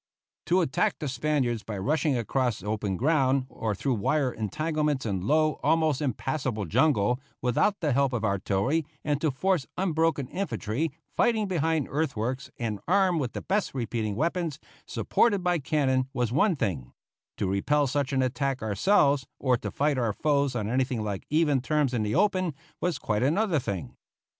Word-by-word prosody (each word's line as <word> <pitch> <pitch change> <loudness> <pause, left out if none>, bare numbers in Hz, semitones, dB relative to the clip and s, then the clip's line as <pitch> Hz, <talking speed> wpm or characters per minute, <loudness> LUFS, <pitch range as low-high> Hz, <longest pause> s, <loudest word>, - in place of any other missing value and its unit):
To 180 +2 +4
attack 145 -6 +1
the 150 - -4
Spaniards 130 -3 0
by 105 -2 -6
rushing 145 +6 +1
across 120 -2 -1
open 105 -2 -2
ground, 135 - +2
or 110 -2 -3
through 135 +7 -1
wire 130 +5 +1
entanglements 150 +5 -1
and 95 -4 -2
low, 155 +6 +2
almost 160 -4 +2
impassable 130 -4 -2
jungle, 125 - +2 0.2
without 190 - +1
the 150 -5 +1
help 140 0 +2
of 115 -4 -1
artillery, 100 +9 0 0.2
and 145 -1 0
to 155 - +2
force 175 +3 0
unbroken 165 -6 +1
infantry, 145 - -2 0.2
fighting 220 -3 +2
behind 160 -4 0
earthworks 130 -3 -2
and 110 -4 -3
armed 185 -3 +3
with 125 - -3
the - - -5
best 200 -6 -1
repeating 115 -4 -2
weapons, 165 - -1 0.3
supported 200 -6 +1
by 175 -1 +2
cannon, 130 -2 +1
was 125 -4 0
one 175 - +3
thing; 85 - -3 0.4
to - - -1
repel 145 +10 +2
such 140 +1 -1
an 130 -1 +2
attack 135 0 -1
ourselves, 140 - +3
or 130 -2 +2
to 120 - -4
fight 145 -2 0
our 115 -4 0
foes 140 0 +1
on 105 -4 -1
anything 125 -1 0
like 100 -2 -4
even 150 -3 +2
terms 150 -1 +1
in 120 - 0
the 105 +3 -1
open, 185 -4 +2 0.3
was 175 -4 0
quite 105 -6 -1
another 165 - +2
thing. 95 - -5
135 Hz, 165 wpm, -27 LUFS, 115-155 Hz, 0.4 s, To